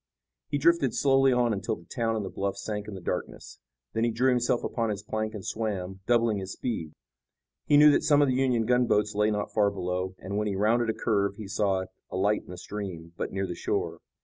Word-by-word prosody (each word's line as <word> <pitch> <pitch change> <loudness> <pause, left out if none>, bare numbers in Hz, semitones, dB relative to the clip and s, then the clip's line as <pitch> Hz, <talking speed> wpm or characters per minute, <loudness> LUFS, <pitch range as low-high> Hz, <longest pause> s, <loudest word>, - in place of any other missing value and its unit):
He 145 - 0
drifted 145 -4 +3
slowly 135 -1 +4
on 120 -2 +2
until 100 -3 -2
the 85 - -16
town 115 0 -1
and 105 -2 -2
the 95 - -6
bluffs 100 0 -3
sank 105 -1 -3
in 105 - -6
the 95 - -8
darkness. - - -5 0.3
Then 115 - 0
he 120 - +3
drew 125 +3 +2
himself 125 -1 +1
upon 115 -2 -1
his 105 -1 -3
plank 110 0 -3
and 100 - -7
swam, 95 -4 -3
doubling 115 -3 +3
his 95 0 -6
speed. 85 -11 -4 0.7
He 145 - +6
knew 150 0 +8
that - - +3
some 150 -2 +4
of 145 - +4
the 130 - +2
Union 125 -3 +2
gunboats 115 -3 +2
lay 105 +1 +2
not 105 -1 -2
far 105 -1 +3
below, 95 -1 -3
and, 100 +2 -5
when 105 - -1
he 100 - -1
rounded 115 +4 +2
a 110 - 0
curve, 100 -3 0
he 105 -1 -8
saw 95 -2 0 0.2
a - - -4
light 105 +3 +2
in - - -18
the 90 - -7
stream, 90 -4 -7
but - - -4
near 95 0 -1
the 90 - -4
shore. - - -2
105 Hz, 230 wpm, -28 LUFS, 95-120 Hz, 0.7 s, knew